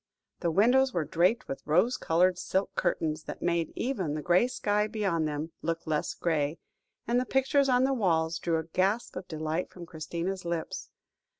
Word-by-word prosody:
The 170 - 0
windows 245 +9 +4
were 165 -3 +1
draped 180 - +2
with 135 - -5
rose 185 +11 +3
coloured 180 +2 +2
silk 190 +1 -1
curtains, 155 -1 -1
that - - -7
made 170 -1 0
even 190 - -1
the 150 - -4
grey 180 +7 +4
sky 210 -4 0
beyond 195 -8 0
them 150 +2 -4
look 165 0 -2
less 155 -1 -1
grey, 155 -2 0 0.5
and 240 +2 +2
the - - +1
pictures 270 +2 +2
on 250 0 +4
the 270 +1 +2
walls 165 -8 +1
drew 165 -1 0
a 160 - -2
gasp 190 +7 0
of 185 0 -6
delight 155 +1 -2
from 175 -2 -10
Christina's 170 +4 -4
lips. 170 -1 -4
175 Hz, 180 wpm, -29 LUFS, 160-215 Hz, 0.5 s, windows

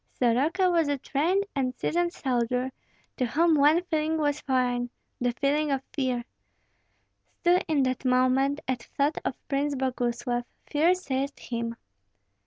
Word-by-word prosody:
Soroka 290 +10 +2
was 335 -3 +3
a 285 -1 0
trained 340 +10 0
and 255 -2 0
seasoned 345 +5 0
soldier, 250 -2 -1 0.5
to 255 - +1
whom 330 +6 +3
one 305 +4 +5
feeling 315 -2 0
was 295 -1 0
foreign, 250 -2 0 0.3
the 245 0 +1
feeling 290 +4 +1
of 270 -1 0
fear. 255 -4 -1 1.2
Still 350 +1 +4
in 295 -4 +2
that 255 0 -1
moment, 260 +2 +2
at 255 -2 -1 0.2
thought 285 +2 +2
of - - -2
Prince 285 0 0
Boguslav, 245 -2 -1 0.2
fear 320 +5 +3
seized 280 -5 -3
him. 235 -1 -4
275 Hz, 140 wpm, -27 LUFS, 255-305 Hz, 1.2 s, one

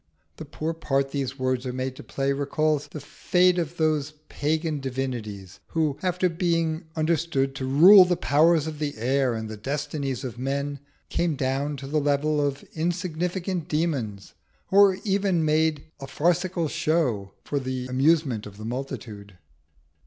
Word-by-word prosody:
The 160 - -7
poor 155 +2 -4
part 135 -4 -1
these 135 -2 -3
words 130 -1 -1
are - - -2
made 130 +1 -3
to - - -10
play 135 0 -1
recalls 145 +1 0
the 155 - -8
fate 180 +5 +2
of 170 0 -4
those 155 -2 0 0.2
pagan 155 +1 -1
divinities 120 -8 -5
who, 155 -4 -1
after 180 0 +1
being 165 -1 0
understood 155 -4 0
to 130 - -3
rule 180 +9 +9
the 180 -1 0
powers 155 +2 +3
of 155 -2 -6
the 145 -5 -3
air 130 +1 +1
and 110 0 -4
the 110 0 -7
destinies 140 +2 -3
of 120 -2 -6
men, 140 +2 -2 0.3
came 170 -3 0
down 135 +2 -1
to 135 - -8
the 150 +3 0
level 145 +1 +1
of 140 -1 -2
insignificant 175 +1 -2
demons, 135 - -2 0.4
or 200 +1 +8
were 190 -1 -1
even 195 -5 +1
made 155 -1 +2 0.2
a 135 - -7
farcical 175 +4 0
show 145 -12 0
for 145 - -2
the 130 -1 -4
amusement 130 -3 +1
of 100 -1 -12
the 110 - -8
multitude. 110 -6 -6
145 Hz, 160 wpm, -25 LUFS, 130-165 Hz, 0.4 s, rule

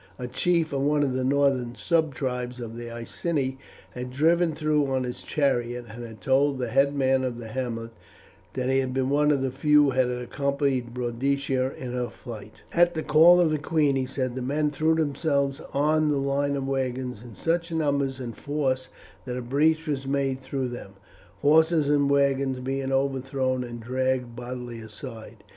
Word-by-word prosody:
A 125 - -5
chief 165 +5 +1
of 135 - 0
one 145 +1 +2
of 135 -3 0
the 130 0 -1
northern 135 -3 +1
subtribes 130 -6 -1
of 115 -1 -6
the 120 0 -6
Iceni 130 +3 -3 0.3
had 125 0 -6
driven 165 +4 +2
through 150 -2 +1
on 130 -1 +1
his 125 -1 -5
chariot 125 -4 0
and 115 +3 -8
had 110 -2 -10
told 135 +1 +2
the 125 -2 -2
headman 135 0 +2
of 125 -2 -2
the 115 -2 -8
hamlet 115 -2 -4 0.6
that 125 -1 -2
he 135 0 +3
had 130 -1 -2
been 130 0 0
one 150 +1 +3
of 140 -3 +2
the 130 - -1
few 150 +3 +4
who 145 - +3
had 130 -1 +2
accompanied 130 0 -1
Boadicea 130 +2 -1
in 125 -2 -5
her 125 -1 -2
flight. 110 -3 -10 0.2
At 175 0 +4
the 160 - -2
call 160 +5 +7
of 170 -3 +3
the 155 - 0
queen, 150 -2 +2
he 130 -1 0
said, 130 -1 -2
the 130 - -4
men 145 +4 0
threw 155 +3 +2
themselves 140 -2 0
on 155 +2 +2
the 145 - +1
line 140 +1 0
of 135 -1 -3
wagons 130 -3 -2
in 120 -3 -11
such 170 +1 -1
number 145 -4 +1
and 120 -3 -6
force 135 -3 -1 0.4
that 125 -1 -4
a - - -3
breach 155 +6 +2
was 135 -2 -2
made 135 -1 0
through 130 -1 -3
them, 120 -5 -8 0.5
horses 155 0 +4
and 145 -1 +3
wagons 140 -2 +2
being 135 +1 -2
overthrown 135 -1 0
and 120 -1 -7
dragged 130 0 -1
bodily 120 -1 -6
aside. 110 +1 -9
135 Hz, 185 wpm, -26 LUFS, 125-145 Hz, 0.6 s, call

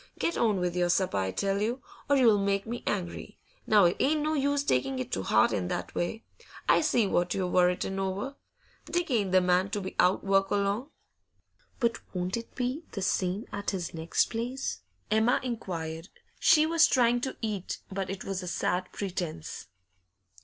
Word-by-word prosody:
Get 335 - 0
on 215 -4 +2
with 180 -1 -1
your 175 -1 +1
supper, 180 - +1
I 95 -1 0
tell 195 - -1
you, 240 +5 -1 0.3
or 285 - +5
you'll 230 -6 +5
make 200 0 0
me 235 +1 -5
angry. 180 -4 -3 0.3
Now, 210 -3 +6
it 175 - +2
ain't 300 +2 +2
no 310 +1 0
use 285 -1 +1
taking 130 - 0
it 130 - -4
to 95 - -1
'eart 110 +3 +4
in 90 -3 -1
that - - -4
way. 195 +6 -2 0.4
I - - +5
see 250 -8 +2
what 180 -2 +1
you're 190 - 0
worritin' 180 +2 +1
over. 195 +9 -3 0.5
Dick 350 -4 -1
ain't 205 -6 +1
the 185 0 +5
man 180 +2 +2
to 205 +1 -2
be 190 - -6
out 180 +2 +4
o' - - -11
work 195 0 +3
long.' 205 +7 0 0.9
'But 235 -2 +1 0.2
won't 180 +1 -1
it 230 0 -7
be 255 +5 -2
the 195 - -3
same 190 +3 0
at 200 0 -2
his 180 -4 -3
next 160 0 0
place?' 245 +4 -3 0.3
Emma 220 +3 +3
inquired. 170 -8 -4 0.3
She 310 -1 +5
was 330 0 +5
trying 245 -4 +3
to 265 - -4
eat, 210 -5 -3
but 190 0 -3
it 195 0 -5
was 195 -1 -3
a 180 - -7
sad 180 +1 -1
pretence. 175 - -5
200 Hz, 190 wpm, -29 LUFS, 180-240 Hz, 0.9 s, Now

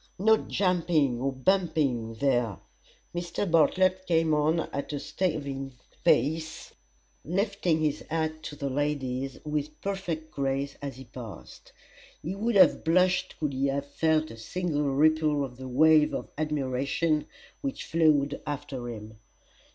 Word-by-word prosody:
no 220 +4 +5
jumping 170 - +1
or 135 +1 0
bumping 135 -6 0
there!" 120 - +1 0.6
Mr. 175 +3 -2
Bartlett 185 +2 +3
came 165 -2 +3
on 155 +2 +2
at 140 - -3
a 145 - -2
staving 140 -5 -3 0.3
pace, 160 +3 +1 0.5
lifting 185 -2 0
his 150 -1 0
hat 155 0 -1
to 150 - -7
the 140 -1 -3
ladies 135 -2 -2
with 150 0 -3
perfect 175 -5 -4
grace 140 0 -2
as 140 -2 -5
he 130 +1 -11
passed. 115 -6 -11 0.5
He 170 - -3
would 220 +3 -1
have 195 - +6
blushed 185 +2 +2
could 150 -4 -1
he 135 +1 +1
have 140 +1 -1
felt 155 +2 +1
a 115 - -10
single 150 +3 -1
ripple 150 0 +3
of 125 -2 -11
the 130 0 -7
wave 155 +4 +5
of - - -5
admiration 150 +1 0 0.3
which 275 -2 -4
flowed 155 -4 +2
after 135 -4 -4
him. 110 -1 -9
150 Hz, 135 wpm, -28 LUFS, 135-165 Hz, 0.6 s, have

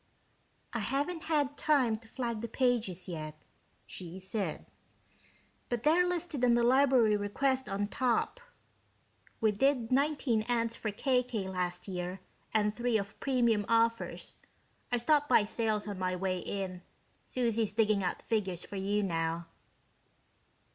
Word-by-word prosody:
"I 235 - -1
haven't 285 - -2
had 290 -3 0
time 265 -7 +3
to 225 +1 -17
flag 235 -2 -3
the 235 - -3
pages 225 -7 0
yet," 155 -3 -7 0.4
she 180 0 -8
said, 190 -2 -3 1.0
"but 240 -2 -2
they're 340 +5 +4
listed 340 -6 -2
on 240 -1 +5
the 240 - +3
library 255 -3 +5
request 260 +6 0
on 200 +1 -1
top. 250 - 0 1.0
We 220 -1 +4
did 245 +2 +1
nineteen 275 -4 +2
ads 230 -1 0
for 220 - -3
KK 250 -2 0
last 180 0 -3
year 180 0 -4 0.3
and 210 -1 +2
three 240 0 +1
of 200 0 -5
premium 235 -6 +2
offers. 230 0 +1 0.5
I 245 - +3
stopped 290 +5 +2
by - - +6
Sales 215 -1 -1
on 200 -2 -5
my 185 0 0
way 185 0 -1
in 185 -1 -4 0.4
Susie's 230 -3 0
digging 215 -2 +2
out 180 - -2
figures 190 -6 -1
for 200 - -7
you 205 +2 0
now." 165 -2 -1
225 Hz, 140 wpm, -31 LUFS, 195-255 Hz, 1.0 s, by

